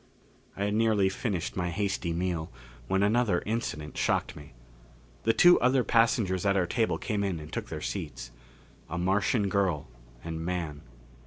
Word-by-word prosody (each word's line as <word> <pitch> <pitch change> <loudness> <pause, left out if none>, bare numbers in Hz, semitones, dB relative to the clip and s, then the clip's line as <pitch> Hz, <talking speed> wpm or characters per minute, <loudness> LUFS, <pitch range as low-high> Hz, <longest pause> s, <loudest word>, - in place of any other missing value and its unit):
I 100 - -1
had 105 - 0
nearly 110 -3 +3
finished 95 -3 -3
my 90 -2 -1
hasty 95 -2 -1
meal 85 -1 -2 0.4
when 95 +6 +2
another 105 -3 +2
incident 100 -9 -3
shocked - - 0
me. 75 0 -12 0.7
The 115 - +5
two 175 +7 +7
other 125 +1 +3
passengers 115 -6 +2
at 100 -1 +2
our 90 - +2
table 110 +5 0
came 105 -4 -2
in 95 -4 -1
and 75 - -10
took - - -4
their - - -5
seats. - - -5 0.6
A 85 - -3
Martian 100 +4 +1
girl 95 -9 0 0.3
and 80 0 -5
man. 85 -4 -3
95 Hz, 160 wpm, -28 LUFS, 85-110 Hz, 0.7 s, two